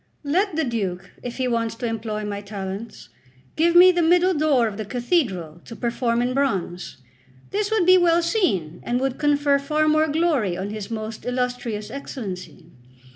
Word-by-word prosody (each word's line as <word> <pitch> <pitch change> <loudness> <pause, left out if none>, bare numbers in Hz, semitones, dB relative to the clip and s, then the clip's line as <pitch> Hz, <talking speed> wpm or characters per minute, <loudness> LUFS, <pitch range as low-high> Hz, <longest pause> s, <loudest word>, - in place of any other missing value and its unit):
Let 355 +5 +1
the 320 - +1
Duke, 195 -7 -3
if 245 -1 -6
he 260 -1 0
wants 230 -2 -1
to 240 - -5
employ 220 -2 -3
my 205 -1 -4
talents, 200 - -7 0.5
give 335 +2 +2
me 365 +1 +9
the 350 -1 +1
middle 355 +3 +4
door 295 -6 +3
of 210 -3 -4
the 215 - -3
cathedral 210 - -1
to 230 - -9
perform 235 0 0
in 250 +1 -1
bronze. 195 -10 -2 0.5
This 410 0 -1
would 440 -5 +2
be 370 +1 +7
well 340 -1 +3
seen, 200 - 0
and 245 +1 -1
would 265 -1 -2
confer 290 -1 +2
far 305 +2 0
more 310 +1 +3
glory 290 - +1
on 195 +2 -4
his 215 -1 -6
most 220 -1 -5
illustrious 245 -4 -3
Excellency. 190 - -7
245 Hz, 175 wpm, -23 LUFS, 210-310 Hz, 0.5 s, me